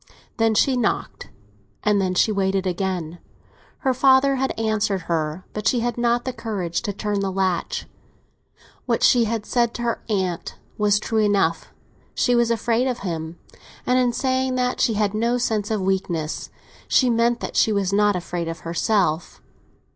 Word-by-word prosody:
Then 225 -1 +2
she 260 +5 +3
knocked, 240 -4 -2 0.5
and 210 -1 +3
then 185 -1 -1
she 215 - +3
waited 195 -1 0
again. 180 -3 -3 0.6
Her 265 -2 +2
father 265 +1 +4
had 265 -3 -2
answered 215 -3 0
her, 165 +1 -2
but 210 0 -2
she 240 0 +2
had 240 +1 -1
not 240 0 +1
the 255 - -2
courage 190 -8 -3
to 205 - -3
turn 205 0 -2
the 195 -1 -1
latch. 185 -2 -1 1.0
What - - 0
she 240 -2 +5
had 225 -1 -2
said 235 0 0
to 240 - -4
her 235 -1 -1
aunt 185 -5 -2 0.2
was 205 -1 +3
true 220 +1 -1
enough—she 205 +4 -1
was 235 -1 +3
afraid 235 +2 +1
of 250 -2 -3
him; 165 -1 -4 0.5
and 250 0 +3
in 250 -1 +2
saying 260 0 0
that 250 0 0
she 225 - +2
had 205 -1 +1
no 235 +3 +1
sense 220 -4 -1
of 215 -3 -1
weakness 185 -5 -2 0.4
she 255 - +4
meant 235 +1 +2
that - - -5
she 220 - +3
was 200 -2 0
not 205 0 +3
afraid 175 -1 -3
of 165 0 -5
herself. 170 -1 0
210 Hz, 170 wpm, -22 LUFS, 185-240 Hz, 1.0 s, she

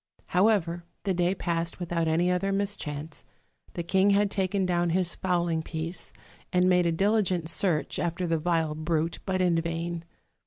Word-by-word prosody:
"However, 180 -3 +2 0.2
the 195 - +1
day 180 +1 +1
passed 170 -1 -2
without 170 -2 -1
any 170 +3 +2
other 190 +2 0
mis 200 +1 +1
chance; 150 -2 -6 0.5
the 170 - -3
king 190 +3 +3
had 200 0 +3
taken 190 0 0
down 175 -1 +1
his 175 0 +1
fowling 175 -3 0
piece, 160 +2 -5 0.4
and 180 0 +3
made 180 -1 +4
a - - +2
diligent 190 -2 +1
search 165 -1 0
after 175 +1 -1
the 165 -1 +1
vile 165 -1 +1
brute, 155 +1 -1
but 185 -1 +1
in 170 -2 +3
vain! 170 0 -3
175 Hz, 165 wpm, -27 LUFS, 165-185 Hz, 0.5 s, made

